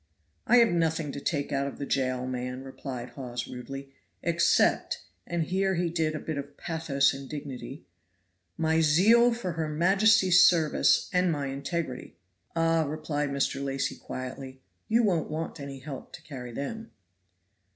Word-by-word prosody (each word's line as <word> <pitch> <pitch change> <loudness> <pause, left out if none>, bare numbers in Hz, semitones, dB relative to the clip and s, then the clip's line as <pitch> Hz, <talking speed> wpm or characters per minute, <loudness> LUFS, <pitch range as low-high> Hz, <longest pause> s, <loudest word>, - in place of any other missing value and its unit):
"I 245 - +6
have 235 -1 +6
nothing 160 -3 0
to 140 - -5
take 145 -1 -2
out 140 0 0
of 140 - -7
the 140 - -4
jail, 130 -2 0
man," 125 0 -4
replied 130 -2 -7
Hawes 125 -3 -5
rudely, 135 +2 -8 0.3
"except" 170 0 +2 0.2
and 170 -1 0
here 190 +3 0
he 170 -1 0
did 160 -2 0
a - - -3
bit 155 -2 -4
of 140 0 -9
pathos 150 -4 +1
and 135 0 -8
dignity 135 -2 -7 0.7
"my 160 0 +2
zeal 215 +11 +5
for 230 -6 -3
her 160 -2 -2
majesty's 190 +3 +5
service 160 -4 +4
and 180 -1 +3
my 145 -3 -2
integrity." 140 - -4 0.4
"Ah," 165 0 +3
replied 150 -1 -2
Mr. 140 0 -1
Lacy 135 0 -2
quietly, 130 +1 -7 0.3
"you 230 +2 +3
won't 175 -7 +1
want 160 +1 -4
any 140 -1 -6
help 135 +2 -9
to 170 -2 -10
carry 125 -5 -8
them." 220 - -5
150 Hz, 155 wpm, -28 LUFS, 135-170 Hz, 0.7 s, I